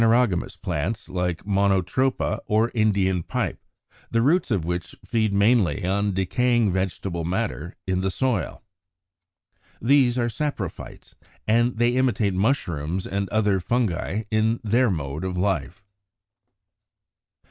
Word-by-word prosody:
There 115 - +5
are 125 +1 +5
phanerogamous 90 -4 -4
plants, 90 +10 -3
like 90 -1 -2
Monotropa 100 +5 +1
or 110 +2 +2
Indian 100 -5 +2
Pipe, - - -3 0.5
the 115 0 +1
roots 165 +6 +2
of 100 -9 0
which 85 0 -3
feed 110 -3 +1
mainly 100 -2 +2
on 100 +2 +1
decaying 120 +3 +2
vegetable 90 -2 -2
matter 90 -2 -3
in 95 -1 0
the 95 - 0
soil. 115 0 -1 1.2
These 125 0 +3
are 120 -1 +1
SAPROPHYTES, 115 - -5 0.3
and 120 +2 +2
they 120 +1 +3
imitate 120 -6 +1
Mushrooms 90 - -1
and 100 0 -2
other 105 -2 +2
Fungi 110 -1 -1
in 110 +1 +2
their 115 +3 +3
mode 75 -3 -3
of 90 -1 -3
life. 95 0 -2
100 Hz, 125 wpm, -24 LUFS, 90-115 Hz, 1.2 s, There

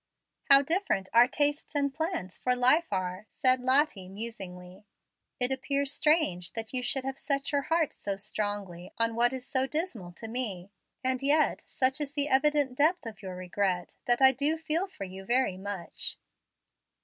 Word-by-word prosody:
"How 275 0 +7
different 320 - 0
our 235 +1 +7
tastes 290 +3 -1
and 280 -1 +1
plans 320 - -3
for 250 0 0
life 255 +3 +3
are!" 185 +1 -3
said 255 0 +3
Lottie, 255 -7 +2
musingly. 190 -3 -7 0.5
"It 250 +1 +2
appears 275 +1 -1
strange 295 - +1
that 225 +1 -5
you 255 - -1
should 270 +1 -1
have 270 0 -4
set 280 -1 -1
your 285 -1 +1
heart 325 +2 0
so 200 -1 -4
strongly 200 -3 -4
on 230 0 +2
what 240 +2 +3
is 260 -1 -6
so 265 -2 0
dismal 270 - -3
to 225 - -9
me. 210 -6 -4 0.3
And 260 0 0
yet 290 +2 +2
such 265 +3 +1
is 285 -1 -2
the 290 0 +1
evident 290 -1 +3
depth 315 +5 +2
of 220 -2 -8
your 190 -2 -7
regret 185 0 -2
that 240 +1 +3
I 265 - +9
do 285 +5 +1
feel 325 +4 -1
for 375 - -9
you 190 0 -8
very 240 -3 +1
much." 195 -3 -4
255 Hz, 175 wpm, -29 LUFS, 200-285 Hz, 0.5 s, I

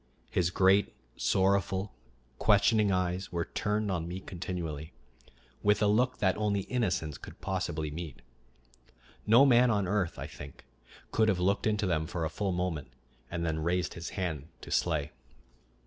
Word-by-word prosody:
His 90 -1 +2
great, 95 +3 +3 0.2
sorrowful, 95 0 +1 0.5
questioning 105 0 +4
eyes 90 0 -1
were 85 -1 -1
turned 105 0 -1
on 85 -3 -2
me 90 +2 -5
continually, 85 -5 -5 0.7
with 105 0 +3
a 105 - +3
look 120 +5 +2
that 95 -3 +2
only 105 -2 +1
innocence 95 - -1
could - - -11
possibly 85 -5 -2
meet. 75 -5 -7 1.0
No 120 +6 +7
man 125 -2 +6
on 100 -4 +1
earth, 95 -3 0
I - - -5
think, 70 -1 -11 0.5
could 110 - +3
have 95 - +2
looked 100 +5 +1
into 105 -1 +1
them 80 -4 0
for 85 -1 -2
a 80 - -3
full 100 -2 -1
moment 90 -5 -2 0.4
and 85 0 -3
then 80 -1 -1
raised 85 +2 0
his 85 +1 -6
hand 80 -6 -2
to - - -9
slay. 75 -4 +1
90 Hz, 155 wpm, -30 LUFS, 85-105 Hz, 1.0 s, No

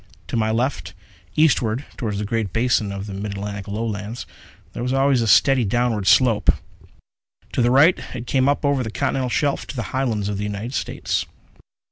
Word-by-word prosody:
To - - -3
my 110 -1 +1
left, 110 - -1 0.4
eastward 130 -5 +2
toward 110 -5 -3
the 105 - -2
great 110 -2 -2
basin 115 -2 +1
of 100 0 -5
the 100 - -7
mid 100 +1 -4
Atlantic 100 0 -5
Lowlands, 105 +2 -4 0.5
there - - -5
was 125 +1 -1
always 135 -2 +3
a 115 - 0
steady 135 +3 +5
downward 115 -2 0
slope. 115 -5 +4 1.0
To - - +1
the 120 - +3
right, 145 +8 +5 0.2
it 120 - -5
came 130 +2 +2
up 145 +1 0
over 140 -2 +2
the 115 - -3
continental 125 +6 -1
shelf 140 +5 0
to - - -7
the 120 - -2
Highlands 115 -6 0
of 100 -1 -2
the - - -2
United 105 +4 -4
States. - - -2
115 Hz, 185 wpm, -22 LUFS, 105-130 Hz, 1.0 s, steady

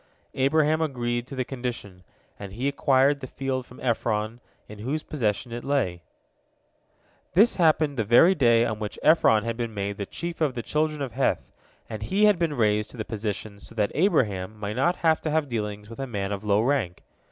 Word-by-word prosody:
Abraham 155 +3 +2
agreed 120 -5 -2
to 135 - -8
the 130 -1 -1
condition, 120 -8 -6 0.4
and 100 -2 -8
he 125 +6 -2
acquired 140 0 +3
the 130 - -7
field 130 -1 -3
from 125 - -14
Ephron, 115 -2 -1 0.3
in 105 -1 -11
whose 140 +8 -3
possession 115 -4 -2
it 120 +1 -5
lay. 115 -12 0 1.3
This 215 +6 +5
happened 155 -4 +3
the 115 - +1
very 120 - +6
day 120 -7 +4
on 110 -2 -3
which 105 -2 -5
Ephron 115 -9 +5
had 115 0 -3
been 115 -3 -4
made 100 0 -3
the 100 - -4
chief 170 -1 -6
of 145 -5 +1
the 120 - -4
children 150 -1 -1
of 130 - -4
Heth, - - -1 0.4
and 110 - -6
he 195 - 0
had 205 -4 +4
been 165 -4 0
raised 105 -2 +1
to - - -13
the 110 - -4
position 105 -2 -5
so 115 - -13
that 105 -2 +1
Abraham 110 - +1
might 105 0 -4
not 170 +8 +2
have 160 -1 +4
to 155 - -2
have 155 -1 +1
dealings 105 -3 -4
with 115 +4 -11
a 135 - -3
man 100 -4 -3
of 100 0 -4
low 105 0 +2
rank. 120 -10 -1
120 Hz, 200 wpm, -25 LUFS, 105-145 Hz, 1.3 s, very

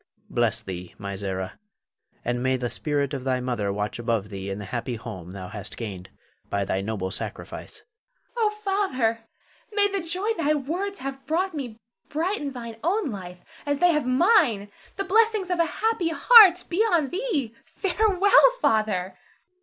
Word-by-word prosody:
Bless - - +1
thee, 90 -2 -7
my 100 -1 -5
Zara, 95 -1 -4 0.7
and 120 0 -1
may 130 0 +1
the 120 -2 -3
spirit 145 +1 -1
of 135 -2 -4
thy 130 -1 0
mother 120 -5 -1
watch 105 +3 -3
above 115 -3 -1
thee 100 -1 -6
in 95 - -3
the 105 - -6
happy 120 +3 -3
home 110 -7 -8
thou 95 -1 -7
hast 105 -1 -6
gained 95 -6 -6 0.4
by 100 0 0
thy 95 - -1
noble 95 -2 -3
sacrifice. - - -6
Zara. - - -40 0.5
Oh, 445 -2 +3
Father, 390 - 0 0.5
may 410 -1 +3
the 395 -1 -2
joy 370 +7 -1
thy 305 -1 +2
words 355 +8 -3
have 270 0 -5
brought 365 +4 0
me 250 -7 -5 0.3
brighten 320 -1 -1
thine 235 -3 -7
own 355 - +1
life 180 -3 -7 0.3
as 285 -1 0
they 355 +4 +5
have 300 -5 0
mine. 255 - +3 0.2
The 390 - -2
blessings 425 -1 +2
of 355 - 0
a 335 - +5
happy 425 0 0
heart 370 0 +8
be 350 - -2
on 345 -11 +3
thee. 350 - -2
Farewell, 405 +4 +4
Father! 210 - +1
255 Hz, 170 wpm, -25 LUFS, -, 0.7 s, heart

